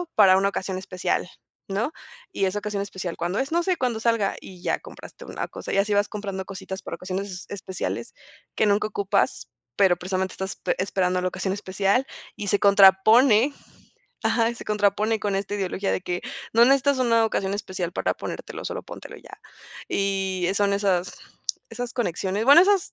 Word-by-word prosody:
para 190 -3 +7
una 195 +1 +2
ocasión 190 -1 -3
especial", 185 -1 -2 0.4
¿no? 215 +8 -1 0.4
Y 195 - 0
esa 190 +2 -1
ocasión 205 -1 -3
especial, 190 -3 -5
¿cuándo 175 +4 -1
es? 270 +2 -2
No 340 +1 +2
sé, 365 0 +1
cuando 245 -5 -1
salga, 225 -3 +1
y 185 -2 -12
ya - - 0
compraste - - -12
una - - -5
cosa, - - -6
y - - +1
así 205 +1 +2
vas 205 0 +3
comprando 200 -2 -4
cositas 190 0 -7
para - - -6
ocasiones 185 0 -5
especiales 190 -2 -5 0.4
que - - +2
nunca 205 0 +2
ocupas, 200 -1 0 0.3
pero 185 -3 +4
precisamente 185 +1 -2
estás 190 0 -5
pe - - -1
esperando 185 -1 0
la 185 - 0
ocasión 190 +1 -2
especial 200 +5 0 0.3
y 205 - -6
se 200 +1 +2
contrapone, 210 +6 +6 0.7
ajá, 230 0 +2
se - - -10
contrapone 210 +1 +1
con 205 -1 -1
esta 200 +1 -3
ideología 195 0 -1
de - - -1
que 180 -1 -3 0.3
no 230 +1 +7
necesitas 275 +1 +3
una 230 -3 +3
ocasión 195 -2 -1
especial 185 -3 -4
para - - 0
ponértelo, - - -7
solo - - -4
póntelo - - -10
y - - -20
ya. - - -13 0.5
Y, 195 -2 0
eh, 190 - 0
son 200 0 +2
esas 195 -3 0 0.6
esas 240 +1 -5
conexiones, 195 -2 -1
bueno, 280 +6 +9
esas 400 0 +2
200 Hz, 180 wpm, -24 LUFS, 190-220 Hz, 0.7 s, bueno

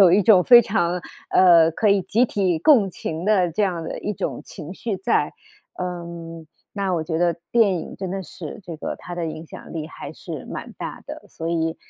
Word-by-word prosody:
有 180 -3 +7
一 200 +2 +5
种 185 -3 +6
非 240 -1 +9
常， 180 -4 0 0.3
呃， 170 -3 +6
可 215 - +1
以 200 -1 +4
集 220 +7 +2
体 185 -8 0
共 225 - +5
情 165 -1 -5
的 190 -5 +3
这 205 +6 +1
样 175 -4 -2
的 165 - -5
一 210 - -3
种 - - -4
情 155 +4 -9
绪 205 0 -3
在。 190 - +1 0.5
嗯， 170 -2 -6 0.3
那 195 -3 -1
我 165 - 0
觉 160 0 -2
得 170 -1 +2 0.2
电 220 -5 +4
影 - - -9
真 190 -1 -4
的 195 -1 -3
是 205 +6 -9
这 170 -3 -7
个， - - -4
它 175 - -10
的 170 -1 -2
影 160 0 -6
响 - - -11
力 155 -1 -4
还 - - -9
是 - - -8
蛮 - - -7
大 - - -6
的， - - -8
所 165 0 -6
以， 165 -1 0
180 Hz, 225 characters per minute, -23 LUFS, 165-200 Hz, 0.5 s, 非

